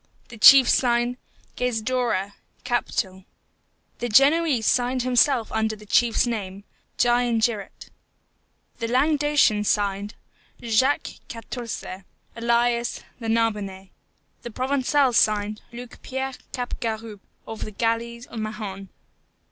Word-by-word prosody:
The 235 - -11
chief 265 +3 +9
signed, 240 0 +2 0.4
GAIZDORRA: 235 -4 -1 0.3
Captal. 205 -6 -2 0.8
The 240 - -3
Genoese 275 +1 +4
signed 250 +2 +1
himself 255 -1 +2
under 220 0 -1
the 210 0 -15
chief's 235 +3 +2
name. 200 -4 -4 0.3
GIANGIRATE. 240 -3 0 0.9
The 230 - -2
Languedocian 290 -4 +2
signed, 205 0 -1 0.4
JACQUES 260 +6 0
QUARTOURZE: 230 0 -6 0.5
alias, 235 0 0 0.2
the 230 - -6
Narbonnais. 210 -4 -1 0.5
The 240 - -7
Provençal 265 +2 +1
signed, 210 -1 +1
LUC 240 0 -10
PIERRE 265 0 -4 0.2
CAPGAROUPE, 225 -4 -5 0.2
of 220 -1 -6
the - - -6
Galleys 235 +2 -2
of 230 - -8
Mahon. 210 -3 -6
235 Hz, 100 wpm, -24 LUFS, 215-250 Hz, 0.9 s, chief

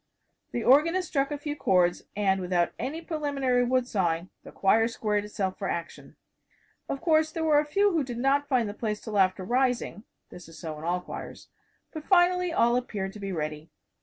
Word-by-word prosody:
The 235 - -2
organist 335 +8 +4
struck 275 -3 0
a 295 - -2
few 290 0 -4
chords, 180 -8 +2
and 195 -2 +1
without 175 -1 +1
any 310 +6 -4
preliminary 280 -6 0
wood 250 0 +1
sawing 175 -5 -1
the - - -11
choir 225 +3 +3
squared 210 -3 -1
itself 195 -3 -3
for 195 - -2
action. 170 0 -6 0.7
Of 275 - -3
course, 315 -2 +3
there 325 0 -3
were 305 -2 +4
a 300 - 0
few 400 +7 +2
who 325 -4 +1
did 245 -3 -6
not 275 +3 +1
find 250 -5 +1
the 205 - -5
place 210 -1 -3
till 210 -3 -3
after 185 0 +2
rising 245 -1 0 0.3
this 180 -2 -11
is 165 - -13
so 160 -2 -6
in - - -10
all 180 +1 0
choirs - - -9 0.4
but 310 - -6
finally 360 0 +3
all 240 -7 +3
appeared 205 -6 -4
to 210 - -10
be 195 -1 -4
ready. 155 -2 -4
240 Hz, 195 wpm, -27 LUFS, 190-290 Hz, 0.7 s, organist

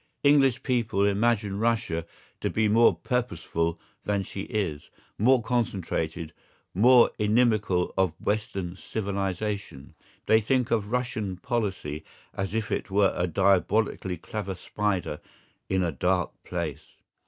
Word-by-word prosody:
English 135 -3 +4
people 115 -6 +1
imagine 100 -1 +1
Russia 110 -8 0 0.3
to - - -1
be 110 -1 +1
more 115 +3 +5
purposeful 85 -8 -2 0.2
than 100 -1 0
she 95 - -6
is, 95 -10 -2 0.3
more 125 +3 +4
concentrated, 90 -9 -2 0.4
more 120 +5 +6
inimical 105 -4 +2
to 95 0 +3
Western 100 -4 -2
civilisation. 100 -6 -4 0.3
They 110 0 +5
think 125 +2 +1
of 105 -3 +1
Russian 110 -6 -2
policy 100 - -3 0.3
as 95 +2 -3
if 110 -2 -2
it - - -2
were 100 0 +3
a 90 - 0
diabolically 95 +1 +1
clever 100 +2 -5
spider 95 -4 -2 0.5
in 95 -1 +1
a 85 - 0
dark 90 +4 0
place. 80 -4 -5
100 Hz, 120 wpm, -27 LUFS, 90-115 Hz, 0.5 s, more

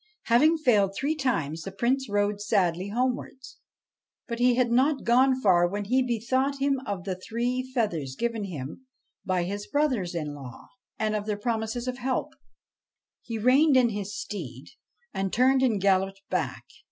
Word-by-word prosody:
Having 300 +8 +4
failed 210 -10 +2
three 280 +8 0
times, 165 - -1
the 195 - -6
Prince 245 +5 0
rode 205 0 0
sadly 190 -3 +1
homewards. 255 +3 -3 0.7
But 235 -2 -4
he 245 0 +4
had 245 -1 +2
not 270 +4 +2
gone 255 +2 +4
far 180 -6 +4
when 205 +3 -4
he 255 +5 +2
bethought 255 +3 0
him 275 -1 +1
of 195 -3 -3
the 190 - -2
three 235 +7 -2
feathers 170 - -1
given 230 - -2
him 155 - -7 0.4
by 185 -2 +1
his 200 +3 -4
brothers 255 -12 0
in 150 -3 -3
law, 130 -5 -11 0.3
and 215 -1 0
of 210 0 -3
their 210 -1 -1
promises 225 +2 -2
of 255 +1 -3
help. 255 +1 -2 0.9
He 230 -2 -5
reined 265 +6 +4
in 245 -2 +4
his 205 -1 -5
steed, 140 - -7 0.4
and 195 -1 -2
turned 260 +3 +3
and 235 -6 +2
galloped 195 0 +1
back. - - -2
220 Hz, 165 wpm, -27 LUFS, 195-255 Hz, 0.9 s, Having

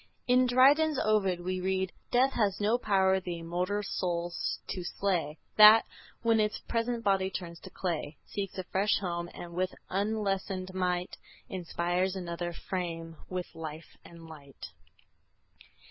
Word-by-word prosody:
In 250 0 +5
Dryden's 280 +5 +5
Ovid 195 -6 +2
we 185 +1 -2
read: 190 0 0 0.2
"Death 260 +2 +3
has 205 -4 +1
no 215 +4 +2
power 190 -3 +3
the 175 -2 -5
immortal 180 +5 -2
soul 175 -3 -2 0.3
to 180 - -4
slay, 175 -5 -1 0.2
That, 215 +1 +10 0.4
when 230 -1 +4
its 210 0 +1
present 230 0 -2
body 195 -2 +2
turns 170 -3 -6
to 185 - -11
clay, 165 -5 -3
Seeks 195 -2 -5
a 185 - -2
fresh 195 +3 +1
home, 175 -2 -3
and 170 -1 -9
with 185 +1 -1 0.2
unlessened 195 -2 -1
might 180 -1 -1 0.3
Inspires 180 +1 -1
another 175 -1 -4
frame 165 -2 -5
with 180 -1 -4
life 160 -1 -8
and 170 -1 -13
light." 140 - -11
185 Hz, 140 wpm, -30 LUFS, 175-205 Hz, 0.4 s, That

